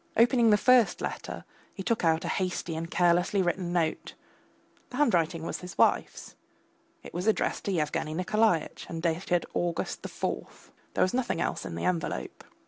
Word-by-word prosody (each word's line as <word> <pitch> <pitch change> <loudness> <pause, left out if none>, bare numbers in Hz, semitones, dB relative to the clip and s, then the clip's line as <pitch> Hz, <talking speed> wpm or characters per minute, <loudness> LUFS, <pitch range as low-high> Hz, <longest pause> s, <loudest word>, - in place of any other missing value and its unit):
Opening 235 0 +5
the 210 - +6
first 250 0 +4
letter, - - -5 0.3
he 195 - -5
took 230 0 0
out 160 -1 +2
a - - -2
hasty 180 -3 -2
and 165 +1 -4
carelessly 175 +3 +3
written 175 0 -1
note. 165 -3 -1 0.7
The 250 - -7
handwriting 170 - +2
was - - -4
his 180 +1 -9
wife's; - - +1 0.7
it - - -11
was 180 +5 -3
addressed 220 - +1
to 200 - 0
Yevgeny 155 -2 -1
Nikolaitch, 185 -1 +1
and 165 -1 -5
dated 175 +1 0
August 170 -1 -2
the - - -6
fourth. - - -5 0.2
There - - +4
was 185 - +1
nothing 245 -9 0
else - - -2
in 85 - -6
the 85 - -3
envelope. 175 -3 -2
180 Hz, 170 wpm, -28 LUFS, 165-210 Hz, 0.7 s, the